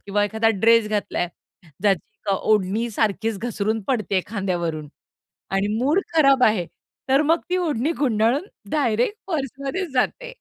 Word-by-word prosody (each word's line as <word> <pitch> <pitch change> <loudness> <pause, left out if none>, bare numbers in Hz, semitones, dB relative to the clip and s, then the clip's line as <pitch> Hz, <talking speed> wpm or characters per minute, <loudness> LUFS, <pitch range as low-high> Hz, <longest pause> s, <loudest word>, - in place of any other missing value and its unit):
किंवा 205 +1 +1
एखादा 220 +2 +1
ड्रेस 225 +1 +4
घातला 210 -1 -2
आहे, 175 - 0 0.5
ज्याची 205 +1 0
का 200 - +2
अ, - - 0
ओढणी 215 +3 +1
सारखीच 220 0 -1
घसरून 220 -1 -2
पडते 215 -7 +1
खांद्यावरून 175 -7 -3 0.6
आणि 195 +1 +1
मूड 290 +10 +2 0.2
खराब 275 -4 +5
आहे, 210 -7 +3 0.4
तर 270 +2 +5
मग 325 +3 +2
ती 365 - +1
ओढणी 310 -4 0
गुंडाळून 245 - +1 0.2
डायरेक्ट 275 - +1
पर्समध्येच 275 +2 -3
जाते. - - -1
225 Hz, 145 wpm, -23 LUFS, 205-275 Hz, 0.6 s, खराब